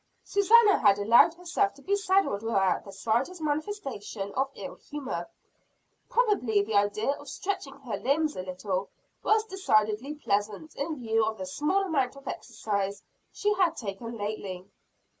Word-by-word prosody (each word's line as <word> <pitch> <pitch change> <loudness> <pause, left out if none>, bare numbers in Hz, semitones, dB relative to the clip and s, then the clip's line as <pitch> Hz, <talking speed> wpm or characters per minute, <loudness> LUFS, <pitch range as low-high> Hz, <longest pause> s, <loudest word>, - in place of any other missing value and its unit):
Susannah 415 +1 +5
had 200 -3 +5
allowed 230 +10 +6
herself 360 +3 0
to 280 - -16
be 400 - +1
saddled 385 - +2
without 195 -5 +1
the 200 - -10
slightest 235 - -1
manifestation 290 - -3
of 270 +1 0
ill 275 - -7
humor; 260 -13 -6 0.8
probably 330 - +2
the 215 +2 -5
idea 205 +4 +2
of 285 - -10
stretching 370 -9 -4
her 250 -5 -4
limbs 300 +3 +1
a - - -3
little, 185 +1 -3 0.3
was 435 0 +3
decidedly 260 - +1
pleasant 210 +3 -2
in 310 +3 -2
view 225 -2 +1
of 220 0 -1
the 190 - -5
small 300 - 0
amount 280 -9 0
of 275 0 -14
exercise 200 -4 -3 0.3
she 415 0 +1
had 360 -5 +2
taken 230 +2 -5
lately. 205 -3 -4
250 Hz, 150 wpm, -28 LUFS, 205-335 Hz, 0.8 s, allowed